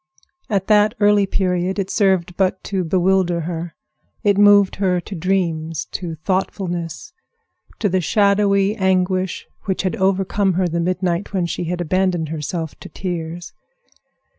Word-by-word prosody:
At 195 -3 0
that 210 +1 +4
early 205 -1 +4
period 185 0 0
it 195 -1 -2
served 190 -4 +1
but 190 0 0
to 190 -2 -2
bewilder 180 0 +1
her. 165 0 -5 0.5
It 205 -1 +3
moved 205 -1 +5
her 185 -2 +1
to 185 - -8
dreams, 165 -3 -1
to 170 -3 -4
thoughtfulness, 175 - -3 0.6
to 215 - 0
the 185 -1 +1
shadowy 200 +2 +2
anguish 185 -2 0 0.2
which 190 -2 -1
had 185 -4 -1
overcome 195 +1 +1
her 180 +1 +1
the 170 0 -2
midnight 180 +2 -1
when 185 -3 +1
she 170 +1 -3
had 175 +1 -2
abandoned 175 -2 0
herself 160 +1 -4
to - - -10
tears. 175 -1 -5
185 Hz, 140 wpm, -20 LUFS, 175-195 Hz, 0.6 s, moved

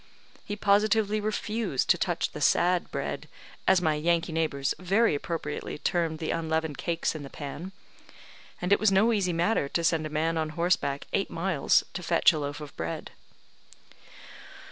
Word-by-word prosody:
He 205 - -4
positively 210 +1 +2
refused 215 - -1
to - - +4
touch - - -1
the - - -8
sad 180 0 +3
bread, - - -4 0.4
as 185 -1 +4
my 155 -2 +3
Yankee 165 +2 +1
neighbours 155 -4 0
very 195 +3 +2
appropriately 160 +2 -4
termed 165 0 0
the 160 - -3
unleavened 160 -2 -2
cakes 170 -1 -1
in 155 - -6
the 140 - -8
pan; 150 +7 -7 0.9
and 180 +3 +2
it - - +4
was 215 -1 +3
no 215 +5 +4
easy 195 -4 +1
matter 170 -3 +1
to 170 - -1
send 165 -1 +1
a - - -9
man 160 +2 0
on 155 -1 -1
horseback 165 -5 0
eight 195 - 0
miles 165 -4 +2
to 180 - -4
fetch 170 0 +4
a 155 - -2
loaf 145 0 -4
of 150 -1 -9
bread. 85 0 -5
170 Hz, 165 wpm, -28 LUFS, 155-195 Hz, 0.9 s, to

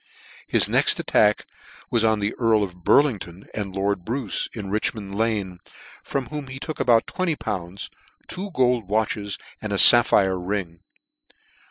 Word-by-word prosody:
His - - +3
next - - +3
attack 105 0 +2 0.5
was 115 -2 +2
on 110 -2 +2
the 100 +1 -1
Earl 110 -3 +3
of 90 -2 -8
Burlington 100 - +1
end 100 -3 -5
Lord 100 -1 -1
Bruce, 120 +1 -3
in 100 -4 -7
Richmond 105 -1 -2
Lane, 100 -4 -2 0.4
from 135 -2 -3
whom 150 -2 -6
they 130 0 -8
took 155 +3 -6
about 115 -2 +3
tv 185 0 -3
enty - - -28
pounds, 90 +2 -5 0.4
two 195 +3 -4
gold 125 - 0
watches, 105 -1 -1 0.2
and 110 - -5
a 100 - 0
fapphire 95 -5 +6
ring. 90 -2 -4
105 Hz, 155 wpm, -23 LUFS, 95-120 Hz, 0.5 s, fapphire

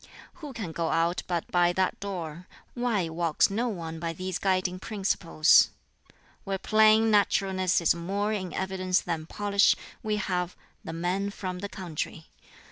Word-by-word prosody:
"Who 295 -2 -6
can 220 -9 -5
go 165 0 -2
out 165 +2 +1
but 175 -2 -2
by 175 0 +3
that 185 0 0
door? 180 -4 -6 0.3
Why 235 -8 0
walks 165 +2 +1
no 235 +5 0
one 165 -5 -5
by 165 0 -3
these 185 +2 -4
guiding 185 -1 0
principles? 190 -6 +3 0.7
"Where 195 -1 -2
plain 220 +2 +4
naturalness 190 -3 +2
is 170 - +3
more 200 +5 -2
in 185 -4 -3
evidence 190 -1 0
than 160 -2 -4
polish, 205 +1 +3 0.3
we 215 -1 -1
have 180 -3 -2 0.3
the - - -6
man 180 +4 -1
from 185 -2 -5
the 200 +2 -5
country. 165 -4 -6
185 Hz, 150 wpm, -28 LUFS, 170-200 Hz, 0.7 s, plain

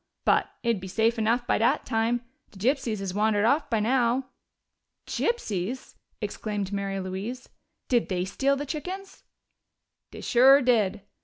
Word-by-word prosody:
But - - +3
it'd 230 -5 +1
be 190 - -6
safe 225 +4 +1
enough 230 +3 +1
by - - +1
dat 230 - +2
time. 230 +2 0 0.2
De 205 - -16
gypsies 240 +1 0
has 190 -2 -3
wandered 210 0 +2
off 285 +6 +2
by 225 - +1
now." 250 +3 +1 0.8
"Gypsies!" 245 - -2 0.3
exclaimed 205 -2 -4
Mary 195 -1 -2
Louise. 195 +7 -5 0.4
"Did 240 -2 +1
they 180 -1 -1
steal 270 +8 +1
the 285 +1 -4
chickens?" 365 +7 -6 0.9
"Dey - - -10
sure 265 +3 +6
did. 215 -6 +2
225 Hz, 145 wpm, -27 LUFS, 205-255 Hz, 0.9 s, sure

